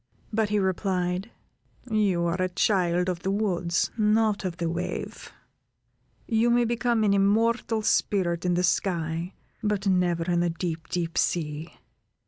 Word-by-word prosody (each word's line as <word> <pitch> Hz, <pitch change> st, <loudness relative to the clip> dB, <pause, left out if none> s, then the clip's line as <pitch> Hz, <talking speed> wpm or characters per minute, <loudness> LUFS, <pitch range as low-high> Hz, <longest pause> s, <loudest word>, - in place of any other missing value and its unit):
But 220 Hz, -1 st, +1 dB
he 210 Hz, -, +1 dB
replied: 185 Hz, 0 st, -1 dB, 0.6 s
"You 195 Hz, -5 st, +2 dB
are 170 Hz, +2 st, -1 dB
a 185 Hz, -, +1 dB
child 180 Hz, -1 st, +1 dB
of 180 Hz, -2 st, -1 dB
the 190 Hz, -, -3 dB
woods, 180 Hz, -4 st, 0 dB
not 215 Hz, -1 st, +2 dB
of 175 Hz, -2 st, -3 dB
the 170 Hz, -2 st, -1 dB
wave; 170 Hz, +2 st, -4 dB, 1.0 s
you 230 Hz, 0 st, +2 dB
may 240 Hz, 0 st, +3 dB
become 235 Hz, -1 st, +1 dB
an 205 Hz, -1 st, +3 dB
immortal 220 Hz, +3 st, +2 dB
spirit 175 Hz, -5 st, +1 dB
in 180 Hz, -1 st, +1 dB
the 180 Hz, -, +1 dB
sky, 170 Hz, -1 st, -1 dB, 0.3 s
but 210 Hz, -2 st, -1 dB
never 180 Hz, -3 st, +2 dB
in 175 Hz, 0 st, 0 dB
the 175 Hz, 0 st, +1 dB
deep, 165 Hz, -1 st, -4 dB
deep 170 Hz, -2 st, -1 dB
sea." 155 Hz, -1 st, -2 dB
185 Hz, 145 wpm, -26 LUFS, 175-210 Hz, 1.0 s, may